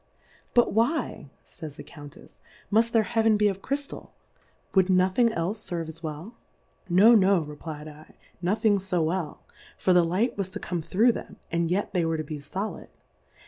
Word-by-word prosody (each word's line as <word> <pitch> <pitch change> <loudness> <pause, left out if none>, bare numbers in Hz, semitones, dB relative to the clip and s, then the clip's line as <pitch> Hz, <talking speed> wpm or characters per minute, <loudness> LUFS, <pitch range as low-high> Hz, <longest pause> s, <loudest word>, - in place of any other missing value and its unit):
Biltr 240 - +4
why, 230 - 0 0.2
jQf - - -18
ys 150 -2 -6
the - - -9
Count 145 -3 -12
efs^ - - -17 0.3
muft 225 +2 +4
their 225 -1 +3
Hea 225 +2 0
ven 220 -1 +4
be 210 0 +3
of 195 -1 -2
Ciyftal, 280 +3 -4 0.6
wou'd 190 -1 +4
nothing 185 +6 +3
elfe 200 +1 -2
ferve 165 -2 -3
as 160 +1 -8
v/ell? 160 +6 -7 0.6
No, 200 +7 +7
no, 195 -6 +4
reflfd 150 +1 -8
i, 155 0 -13 0.3
no 185 +4 +1
thing 215 -2 +2
fo 180 -3 -1
well; 165 -1 -3 0.3
for 185 - +2
the 175 -1 +5
Light 190 +9 0
was 190 -2 -2
to - - -7
come 175 -2 -3
through 220 +9 +3
them., - - -8 0.2
and 170 -1 0
yet 195 +3 -1
they 180 - +2
v/ere 165 -1 0
to 155 - -3
be 150 0 -6
foUd. 190 +9 -5
185 Hz, 190 wpm, -26 LUFS, 165-215 Hz, 0.6 s, No